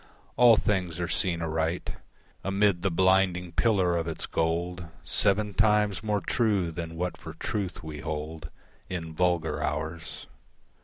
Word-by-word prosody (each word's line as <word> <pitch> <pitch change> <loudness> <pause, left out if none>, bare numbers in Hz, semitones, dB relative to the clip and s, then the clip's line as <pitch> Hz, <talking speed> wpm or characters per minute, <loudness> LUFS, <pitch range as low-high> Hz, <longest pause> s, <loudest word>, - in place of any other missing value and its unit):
All 120 -2 +7
things 90 -6 0
are 90 - -1
seen 85 -2 0
aright 80 +2 -1 0.5
Amid 95 -2 +2
the 95 - +1
blinding 95 0 +2
pillar 95 -2 +2
of 85 -1 -1
its 80 - -2
gold, 85 +1 -1 0.2
Seven 105 +1 +2
times 105 0 +3
more 105 -2 0
true 100 -4 +1
than 80 0 -6
what 90 +2 -3
for 80 -1 -9
truth 100 -1 -3
we 75 -1 -7
hold 75 +1 -5 0.4
In 80 -3 -4
vulgar 85 -1 0
hours. 80 +3 -4
90 Hz, 140 wpm, -28 LUFS, 80-100 Hz, 0.5 s, All